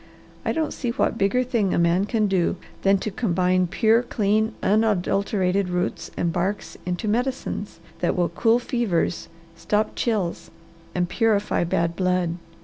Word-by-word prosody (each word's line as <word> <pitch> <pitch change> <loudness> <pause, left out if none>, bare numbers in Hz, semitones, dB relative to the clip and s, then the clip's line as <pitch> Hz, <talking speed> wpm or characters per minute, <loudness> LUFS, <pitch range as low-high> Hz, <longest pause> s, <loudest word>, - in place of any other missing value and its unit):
I - - 0
don't 320 -1 -1
see 245 - -3
what 235 -1 0
bigger 200 +6 +2
thing 230 -7 0
a - - +1
man 170 +3 +3
can 215 0 +1
do 190 -3 +1 0.3
than 195 0 +4
to 215 - -2
combine 185 -3 +1
pure, 220 +6 +3
clean, 215 -1 0
unadulterated 200 -2 +1
roots 180 +2 -2
and 170 -1 0
barks 190 +4 -2
into 180 +5 -2
medicines 225 -5 -2 0.2
that 175 - 0
will 175 -2 +1
cool 225 +7 +3
fevers, 235 -9 -1 0.3
stop 210 +1 0
chills, 205 -8 -1 0.5
and 175 -1 +1
purify 210 -2 +1
bad 170 0 0
blood. 180 -1 +1
200 Hz, 145 wpm, -24 LUFS, 180-225 Hz, 0.5 s, than